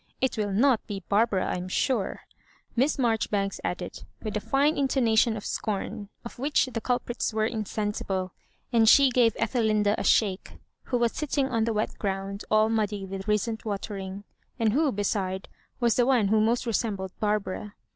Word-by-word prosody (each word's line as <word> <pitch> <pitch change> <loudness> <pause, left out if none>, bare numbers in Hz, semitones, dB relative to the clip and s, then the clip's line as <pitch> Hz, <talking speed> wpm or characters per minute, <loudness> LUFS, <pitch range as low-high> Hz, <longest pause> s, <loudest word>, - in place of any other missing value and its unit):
It 260 - 0
will 210 -2 -1
not 240 +4 +3
be 195 -3 -5
Barbara, 200 -2 +2
I - - -1
am 180 +1 -5
sure," 210 +2 -1 0.5
Miss 265 +5 +2
Marjoribanks 215 -5 0
added, 180 - -4 0.2
with 215 -1 -4
a - - +1
fine 280 +7 +2
intonation 235 -4 +2
of 205 - -8
scorn, 205 -1 -3 0.2
of 235 - -9
which 285 +3 +2
the 240 -3 -5
culprits 240 -2 -1
were 215 0 +2
insensible; 210 -4 -2 0.4
and 225 -2 +6
she 275 0 +7
gave 240 -2 +3
Ethelinda 215 -3 +1
a - - -2
shake, 195 -4 +2 0.3
who 250 - 0
was 235 -1 +2
sitting 280 -3 -1
on 225 -2 +1
the 230 - 0
wet 215 +1 -2
ground, 195 0 -3
all 215 0 +4
muddy 210 -3 -1
with 195 +1 -6
recent 220 +2 0
watering, 200 -2 -5 0.3
and 220 -2 +2
who, 295 +1 +2
beside, 195 -2 -2 0.3
was 235 -3 +2
the 245 - +4
one 240 -7 +3
who 215 0 +4
most 235 +3 +1
resem 225 -2 0
bled 190 -1 -6
Barbara. 210 -1 -2
215 Hz, 175 wpm, -27 LUFS, 200-235 Hz, 0.5 s, she